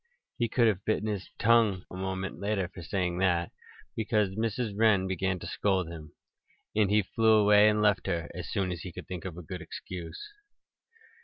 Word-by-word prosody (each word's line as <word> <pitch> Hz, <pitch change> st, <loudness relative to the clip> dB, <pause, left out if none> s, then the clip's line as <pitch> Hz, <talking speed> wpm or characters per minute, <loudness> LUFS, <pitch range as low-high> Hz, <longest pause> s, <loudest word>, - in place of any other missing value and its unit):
He 120 Hz, -1 st, +1 dB
could 120 Hz, +1 st, +3 dB
have 100 Hz, -3 st, 0 dB
bitten 110 Hz, 0 st, 0 dB
his 100 Hz, -3 st, -3 dB
tongue 110 Hz, -5 st, +3 dB
a -, -, -7 dB
moment 95 Hz, -1 st, -4 dB
later 100 Hz, -2 st, -1 dB
for 90 Hz, 0 st, -11 dB
saying 90 Hz, 0 st, -2 dB
that, 90 Hz, -3 st, +1 dB, 0.4 s
because 105 Hz, -2 st, +1 dB
Mrs. 110 Hz, +1 st, -2 dB
Wren 105 Hz, -3 st, +4 dB
began 95 Hz, 0 st, -1 dB
to 85 Hz, -, -9 dB
scold 95 Hz, -1 st, 0 dB
him. 80 Hz, -3 st, -10 dB, 0.6 s
And 105 Hz, -2 st, +3 dB
he 105 Hz, 0 st, +3 dB
flew 110 Hz, +4 st, +3 dB
away 105 Hz, 0 st, +6 dB
and 105 Hz, 0 st, +1 dB
left 105 Hz, -3 st, +2 dB
her 85 Hz, -3 st, -1 dB
as 90 Hz, -1 st, -6 dB
soon 95 Hz, -5 st, -1 dB
as 85 Hz, -, -5 dB
he 90 Hz, -, -7 dB
could -, -, -9 dB
think 90 Hz, 0 st, -6 dB
of 90 Hz, -3 st, -6 dB
a 90 Hz, -, -7 dB
good 90 Hz, +1 st, -7 dB
excuse. 85 Hz, +1 st, -7 dB
95 Hz, 190 wpm, -29 LUFS, 90-105 Hz, 0.6 s, away